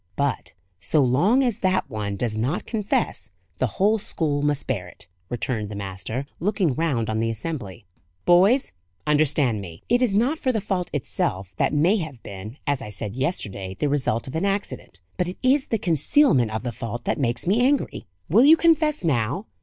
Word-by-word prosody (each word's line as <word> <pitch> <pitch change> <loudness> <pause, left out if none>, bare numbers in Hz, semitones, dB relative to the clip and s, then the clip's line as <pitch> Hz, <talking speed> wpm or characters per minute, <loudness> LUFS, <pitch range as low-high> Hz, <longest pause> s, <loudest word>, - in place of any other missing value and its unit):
"But, 140 -5 -1 0.3
so 140 +10 +2
long 180 - +3
as 240 -4 0
that 185 -6 +1
one 105 -5 -4
does 110 +1 -2
not 125 +10 -1
confess, 210 - -1 0.3
the 130 - +2
whole 215 +3 +3
school 150 -6 -1
must 145 -1 0
bear 100 -9 -2
it," 90 - -13 0.2
returned 115 -3 -2
the 105 - -6
master, 100 +6 -4
looking 190 -4 +1
round 135 -7 0
on 110 0 -1
the 115 0 0
assembly. 110 - -5 0.4
"Boys, 195 +10 +4 0.3
understand 145 -7 +2
me. 85 -3 -10
It 245 +2 +3
is 230 -6 +2
not 260 +9 +2
for 260 - +1
the 225 - 0
fault 190 -3 -2
itself 95 -9 -2
that - - +2
may 165 +8 +3
have 155 - -6
been, 100 +6 -8
as 145 -2 0
I - - -7
said 105 +1 -5
yesterday, 100 - -3
the 150 - 0
result 135 -5 0
of 130 - -7
accident; 195 - -3 0.2
but 180 - 0
it 180 - -6
is 265 +2 +3
the 225 - 0
concealment 165 - +3
of 110 +1 -4
the 120 - -2
fault 115 0 -6
that - - -1
makes 120 -3 -1
me 210 +7 +3
angry. 270 - 0 0.2
Will 220 +9 +5
you 320 +3 +8
confess 315 - +3
now? 140 - 0
145 Hz, 185 wpm, -24 LUFS, -, 0.4 s, you